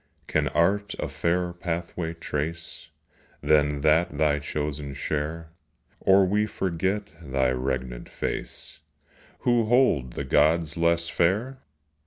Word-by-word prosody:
Can - - +1
Art 100 +4 +1
a - - -2
fairer 90 +1 -1
pathway 85 -1 -4
trace 80 +1 -4 0.5
Than 75 -2 +3
that 80 0 +3
thy 75 -1 +2
chosen 75 -1 -4
share, 80 +3 -3 0.5
Or 95 0 +5
we 105 +3 +1
forget 95 +1 -2
thy 65 -4 0
regnant 65 -1 -3
face, - - -5 0.6
Who 120 -2 +3
hold 110 - +3
the - - -3
gods 80 +4 +3
less 85 0 +2
fair? 105 +11 0
85 Hz, 115 wpm, -26 LUFS, 75-90 Hz, 0.6 s, Or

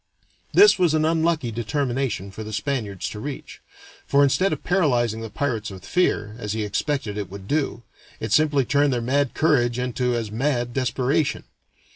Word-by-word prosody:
That 410 - +7
was 170 -4 +3
an 155 0 +2
unlucky 160 -5 +1
determination 120 -3 -2
for 110 +3 -7
the 110 - -7
Spaniards 110 -6 -3
to 105 - -7
reach, 140 +5 -7 0.5
for 140 0 +4
instead 185 +8 +2
of - - -4
paralyzing 120 - +1
the 115 - -6
pirates 115 -2 -2
with 95 -1 -10
fear, 105 -12 0
as 105 -3 -3
he 110 -1 -2
expected 105 0 -2
it 100 - -5
would 100 0 -9
do, 140 -4 -1 0.4
it - - -4
simply 145 -3 +3
turned 145 +2 +2
their 120 - 0
mad 130 +3 0
courage 120 -7 +2
into 125 0 -1
as 115 -3 -3
mad 120 0 -1
desperation. 130 +3 0
125 Hz, 170 wpm, -23 LUFS, 110-145 Hz, 0.5 s, That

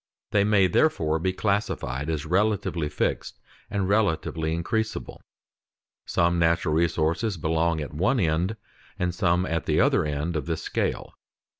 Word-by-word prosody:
They 100 -1 +3
may 100 -2 +4
therefore 80 - +2
be 95 +3 0
classed 100 +2 0
as 75 +5 -3
relatively 95 -3 0
fixed - - -2 0.3
and 100 -2 -1
relatively 80 -6 0
increasable. 110 +6 -3 0.9
Some 85 0 +2
natural 85 -1 +2
resources 85 +5 +1
belong 80 +1 0
at 75 - -6
one 100 - +1
end, 85 +4 +1 0.4
and 90 -1 -1
some 90 -2 +1
at 80 -2 -2
the - - +2
other - - +3
end 75 +3 -2
of 75 -3 -3
this 80 -1 -2
scale. - - -2
85 Hz, 140 wpm, -25 LUFS, 80-100 Hz, 0.9 s, may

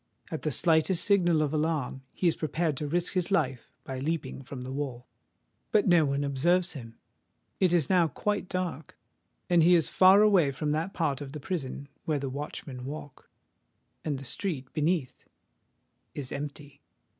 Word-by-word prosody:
At 160 - -3
the 155 - -1
slightest 165 +4 +3
signal 175 -6 +3
of 150 0 -2
alarm 150 -4 -1
he 180 - 0
is 165 - +3
prepared 155 0 -1
to 150 - -3
risk 175 +4 0
his 180 -1 0
life 135 - 0
by 130 -1 -5
leaping 155 0 -3
from 130 -1 -8
the 130 - -6
wall. 135 -3 -4 0.7
But 210 - +3
no 175 -4 +5
one 140 0 0
observes 170 +7 +1
him: 115 -6 -9 0.6
it 185 -3 +3
is 170 -5 +3
now 180 -3 +4
quite 200 +6 -2
dark;—he 175 0 0
is 165 - +2
far 190 +2 +7
away 190 -9 +5
from 150 +2 -2
that 160 +5 -2
part 150 -4 0
of 140 -1 -7
the 150 - -5
prison 140 -4 -4 0.2
where 155 -2 +1
the 135 -1 -3
watchmen 140 -2 -6
walk;—and 145 +1 -9
the 135 - -8
street 135 -1 -3
beneath 155 -3 -1 0.9
is 135 -3 -5
empty. 145 0 -7
155 Hz, 160 wpm, -28 LUFS, 140-175 Hz, 0.9 s, far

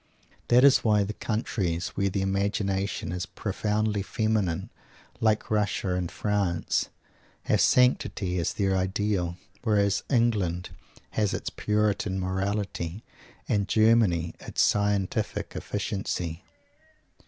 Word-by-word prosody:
That 125 +2 +5
is 140 -1 +7
why 105 -2 +4
the 105 +2 -4
countries 95 -6 -2
where 100 0 -1
the 95 0 -1
imagination 100 0 -1
is 90 0 -3
profoundly 105 0 -1
feminine 105 -3 -1 0.5
like 110 -1 +1
Russia 105 -3 0
and 90 -2 -2
France 100 -5 0 0.5
have - - +2
sanctity 105 -7 +2
as 85 - -1
their 95 -2 +1
ideal. 95 -2 -1 0.3
Whereas 100 -3 +2
England 105 -9 +1 0.4
has 105 -3 0
its - - -4
Puritan 105 -2 0
morality, 95 0 -2 0.4
and 100 -2 +1
Germany 110 -7 +3
its - - 0
scientific 100 -2 0
efficiency. 90 -5 -3
100 Hz, 110 wpm, -27 LUFS, 95-105 Hz, 0.5 s, is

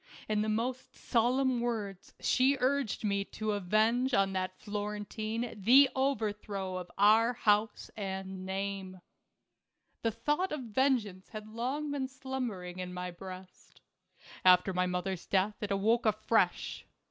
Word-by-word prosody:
In 215 -1 +1
the 215 - -1
most 245 +4 -2
solemn 250 +1 +1
words 210 -6 -4
she 265 +2 +3
urged 265 -4 0
me 200 -1 +1
to 215 +1 -3
avenge 220 +6 +2
on 195 -1 +2
that 185 0 -2
Florentine 210 +2 -4
the 250 +7 +6
overthrow 210 -7 -1
of 180 -1 -6
our 220 +4 +5
house 210 -2 +1
arid 190 -2 -4
name. 190 0 -5 1.0
The 230 - +1
thought 295 - -1
of 300 - -3
vengeance 230 -5 0
had 215 -1 -8
long 260 +7 -3
been 275 -2 -2
slum 265 -1 -4
bering 180 -4 -7
in 180 0 -5
my 180 0 -4
breast. 185 +1 -11 0.6
After 185 +1 +6
my 180 0 +1
mother's 180 0 -3
death 200 +2 +1
it 210 - -3
awoke 220 +4 +2
afresh. 215 +1 +1
210 Hz, 135 wpm, -31 LUFS, 190-245 Hz, 1.0 s, the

